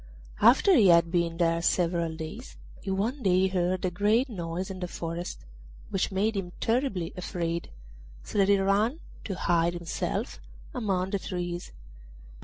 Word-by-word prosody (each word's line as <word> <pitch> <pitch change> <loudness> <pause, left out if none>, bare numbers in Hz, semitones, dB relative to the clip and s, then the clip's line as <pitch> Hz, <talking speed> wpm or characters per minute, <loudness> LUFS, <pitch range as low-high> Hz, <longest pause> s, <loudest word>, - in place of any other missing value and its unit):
After 260 - +6
he 210 -5 +6
had 170 -1 +5
been 170 -2 0
there 165 -1 +2
several 170 -2 +1
days, 160 +10 -8 0.2
he 195 - -6
one 220 +9 -1
day 185 -2 +3
heard 185 0 0
a 180 - 0
great 215 +8 +2
noise 180 -2 -4
in 185 - -7
the 180 - -3
forest, 170 0 -5 0.5
which 195 - 0
made 205 +3 +1
him 180 -3 -4
terribly 225 -8 0
afraid, 170 -2 -3 0.5
so - - -3
that 195 0 +4
he 200 - +6
ran 205 +9 +1 0.3
to 195 - -3
hide 170 -1 +1
himself 170 -1 -3 0.3
among 190 -4 -1
the 200 - 0
trees. 175 -2 -4
185 Hz, 155 wpm, -28 LUFS, 170-200 Hz, 0.5 s, After